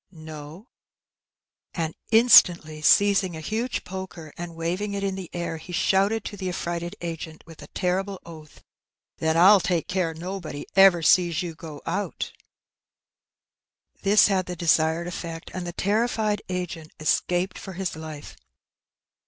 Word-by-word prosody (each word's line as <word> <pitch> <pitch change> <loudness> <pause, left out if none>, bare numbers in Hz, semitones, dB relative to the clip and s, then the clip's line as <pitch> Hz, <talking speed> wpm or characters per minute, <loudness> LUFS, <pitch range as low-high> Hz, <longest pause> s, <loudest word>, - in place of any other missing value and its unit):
' - - -68
" - - -50 0.2
No/^ 155 +6 -10 1.1
And 160 -2 -2 0.2
instantly 175 -9 +6
seizing 195 0 +4
a - - -6
huge 220 +9 -3
poker 180 -5 -8
and 175 -1 -7
waving 180 +5 -2
it 200 - -3
in 195 -1 -1
the 190 -2 -7
air, 170 -2 -4
he 180 - -11
shouted 195 +5 +1
to - - -5
the 190 -2 -4
affrighted 175 +1 -4
agent, 165 -2 -6
with 165 -1 -14
a - - -10
terrible 190 +1 -2
oath, 155 -3 -13 0.6
''Then 160 0 +1
I'll 195 +4 +8
take 175 -2 -1
care 180 -3 -1
nobody 170 -3 -6
ever 195 -3 +6
sees 175 0 +3
you 170 -2 -5
go 160 -2 -10
out/^ 205 - -3 1.7
This 205 +2 +5
had 190 -3 +1
the 180 - -4
desired 160 0 +2
effect, 170 -2 -6
and 180 -1 -5
the - - -3
terrified 215 +1 0
agent 175 -3 -4
escaped 175 +4 0
for 190 - -8
his 185 -1 -3
life. 155 -2 -9
175 Hz, 150 wpm, -25 LUFS, 165-195 Hz, 1.7 s, I'll